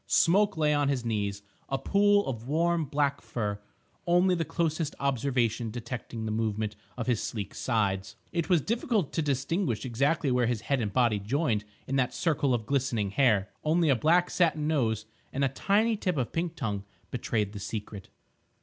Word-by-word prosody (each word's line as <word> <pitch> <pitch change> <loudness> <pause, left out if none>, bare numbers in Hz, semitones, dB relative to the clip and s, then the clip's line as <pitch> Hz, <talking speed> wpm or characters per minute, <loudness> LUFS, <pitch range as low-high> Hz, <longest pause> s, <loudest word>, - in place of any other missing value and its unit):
Smoke 200 +2 +3
lay 150 -1 +3
on 145 -1 +2
his 130 -4 -1
knees, 100 -3 -2 0.3
a 135 - 0
pool 205 +7 +3
of 120 -2 -5
warm, 165 +2 +1
black 140 0 0
fur, 105 -3 -3 0.5
only 180 +2 +4
the 170 -2 +1
closest 160 -1 -1
observation 125 -4 0
detecting 120 0 -5
the 110 - -2
movement 110 -1 -1 0.2
of 115 - -2
his 120 -4 +1
sleek 105 -4 -4
sides. 100 -5 -1 0.2
It 170 0 -1
was 175 -4 +4
difficult 220 - 0
to - - +1
distinguish 140 - -1
exactly 135 +4 +1
where 125 -1 +2
his 120 -3 -1
head 135 +2 0
and 105 -3 -2
body 115 -2 +2
joined 110 0 0 0.2
in 135 - -1
that 130 -1 +1
circle 150 -5 +1
of 120 -3 0
glistening 125 -6 0
hair; 105 -4 +3
only 160 +1 +3
a 135 - +5
black 170 +8 +3
satin 160 -4 +2
nose 115 -8 +1 0.3
and 140 - -1
a - - +1
tiny 210 - +2
tip 180 -5 -1
of 125 -3 -2
pink 170 0 -2
tongue 105 -9 -3 0.3
betrayed 110 -4 -1
the 105 - -6
secret. 105 -2 -6
135 Hz, 175 wpm, -28 LUFS, 110-160 Hz, 0.5 s, a